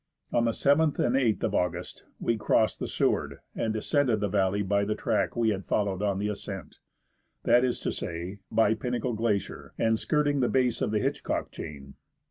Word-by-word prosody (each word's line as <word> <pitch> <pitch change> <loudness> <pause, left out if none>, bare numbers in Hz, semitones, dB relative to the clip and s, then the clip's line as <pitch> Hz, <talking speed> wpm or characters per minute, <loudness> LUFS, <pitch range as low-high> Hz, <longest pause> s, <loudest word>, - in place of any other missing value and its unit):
On 120 - +3
the 115 - +2
7th 145 +5 +3
and 120 - +2
8th 125 -5 +2
of - - 0
August 90 - -2
we 115 - +1
crossed 110 0 +2
the - - -3
Seward, - - 0 0.2
and 110 - -1
descended 120 +1 +1
the 105 - 0
valley 100 0 +1
by 100 +1 +1
the 105 +1 -1
track - - 0
we 115 -1 +2
had 100 -2 -1
followed 100 -2 0
on 100 -2 +1
the 105 +1 -1
ascent; 95 -5 -6 0.6
that 120 +1 +5
is 125 -1 0
to - - -1
say, 85 +4 -5
by 110 -1 +4
Pinnacle 125 +1 -2
Glacier, 110 -2 -2
and 110 0 +2
skirting 145 -2 +1
the 125 - +2
base 125 -3 +1
of - - +1
the 105 - +1
Hitchcock - - -2
chain. 70 -2 -8
110 Hz, 190 wpm, -28 LUFS, 100-120 Hz, 0.6 s, that